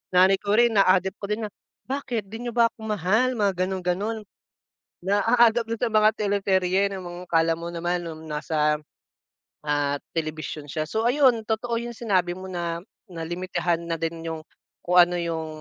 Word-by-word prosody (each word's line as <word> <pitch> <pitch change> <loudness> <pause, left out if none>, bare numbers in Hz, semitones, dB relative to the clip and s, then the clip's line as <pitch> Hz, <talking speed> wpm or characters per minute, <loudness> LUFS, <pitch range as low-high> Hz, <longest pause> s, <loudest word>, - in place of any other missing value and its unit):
nanay 190 +1 +6
ko 205 0 0
rin 240 +1 +5
na-a-adapt 190 -2 +3
ko - - -5
din 210 +2 -2
na, 210 - -4 0.3
"Bakit 255 -5 -3
di 235 +2 -6
niyo 240 - -5
ba 230 -1 +4
ako - - -42
mahal?" 215 +6 +1
Mga 205 -4 +2
ganon-ganon. 190 +4 -2 0.8
Na-aadapt 225 +4 +3
na 230 - -8
sa 235 - +2
mga 215 0 +5
teleserye 195 -2 +1
na 190 - -6
mga 175 0 -8
akala 165 -1 +2
mo 170 - -6
naman 175 +1 -2
noong 160 -1 -7
nasa, 150 0 0 0.8
ah, 145 -1 0 0.2
telebisyon 155 -1 -4
siya. 155 +1 -4
So 220 +4 -1
ayun, 245 -3 +4
totoo 230 +2 -1
'yung 235 +1 -4
sinabi 185 -7 0
mo 185 +1 -8
na 170 -2 -3 0.2
na 175 -6 -8
limitahan 175 0 -2
na 165 -1 -3
din 165 0 -3
'yung, 160 -1 -4 0.4
kung 180 +1 +1
ano 175 0 +7
'yung 165 -2 -2
185 Hz, 175 wpm, -25 LUFS, 170-220 Hz, 0.8 s, ano